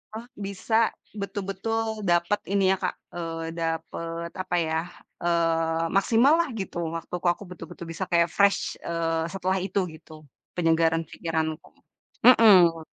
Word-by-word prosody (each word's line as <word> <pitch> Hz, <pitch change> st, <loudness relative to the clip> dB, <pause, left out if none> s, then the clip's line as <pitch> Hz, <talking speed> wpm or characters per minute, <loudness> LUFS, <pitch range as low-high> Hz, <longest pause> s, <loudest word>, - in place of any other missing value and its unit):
ah 225 Hz, +2 st, -6 dB
bisa 200 Hz, +2 st, -3 dB, 0.5 s
betul-betul 205 Hz, +3 st, -3 dB
dapat 175 Hz, +4 st, +2 dB
ini 195 Hz, -1 st, +3 dB
ya 190 Hz, -, +2 dB
Kak, -, -, -1 dB, 0.2 s
e -, -, -4 dB, 0.4 s
dapet 165 Hz, 0 st, -4 dB
apa 175 Hz, -, -2 dB
ya, 160 Hz, -1 st, 0 dB, 0.4 s
eee, 165 Hz, -1 st, +1 dB
maksimal 230 Hz, +8 st, +4 dB
lah 340 Hz, -4 st, +1 dB
gitu. 190 Hz, -2 st, -5 dB, 0.2 s
Waktuku 175 Hz, +2 st, -4 dB
aku 205 Hz, -, -12 dB
betul-betul 175 Hz, -1 st, -9 dB
bisa 165 Hz, -, -4 dB
kaya 170 Hz, 0 st, +4 dB
fresh, 200 Hz, 0 st, +2 dB
eee, 165 Hz, -1 st, -1 dB
setelah 190 Hz, 0 st, 0 dB
itu 200 Hz, -, -1 dB
gitu. 155 Hz, 0 st, -14 dB, 0.4 s
Penyegaran 165 Hz, -1 st, +2 dB
pikiranku, 160 Hz, -1 st, -3 dB, 0.6 s
mhm. 190 Hz, -9 st, +7 dB
175 Hz, 130 wpm, -26 LUFS, 165-200 Hz, 0.6 s, mhm